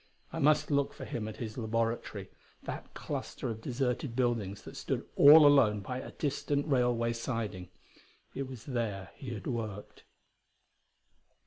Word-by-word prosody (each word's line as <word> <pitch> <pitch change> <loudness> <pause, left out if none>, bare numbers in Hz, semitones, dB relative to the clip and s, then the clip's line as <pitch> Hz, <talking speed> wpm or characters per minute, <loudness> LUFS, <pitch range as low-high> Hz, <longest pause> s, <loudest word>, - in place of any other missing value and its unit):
I - - -3
must 150 +1 +3
look 140 -1 +2
for - - -7
him 110 -3 -4
at 110 - -7
his 110 0 -5
laboratory, 115 +1 -2 0.3
that - - -6
cluster - - -4
of 110 0 -7
deserted 125 0 -2
buildings 115 -6 0
that - - -10
stood - - -3
all 150 +2 +9
alone 125 -8 +5
by 125 +6 -4
a - - -7
distant 145 0 -1
railway 120 -4 +2
siding; 115 -6 -4 0.6
it 135 -1 -3
was 130 -4 -9
there 115 -7 -3
he 130 -3 -8
had 100 - -8
worked. 110 -4 -5
120 Hz, 145 wpm, -31 LUFS, 110-135 Hz, 0.6 s, all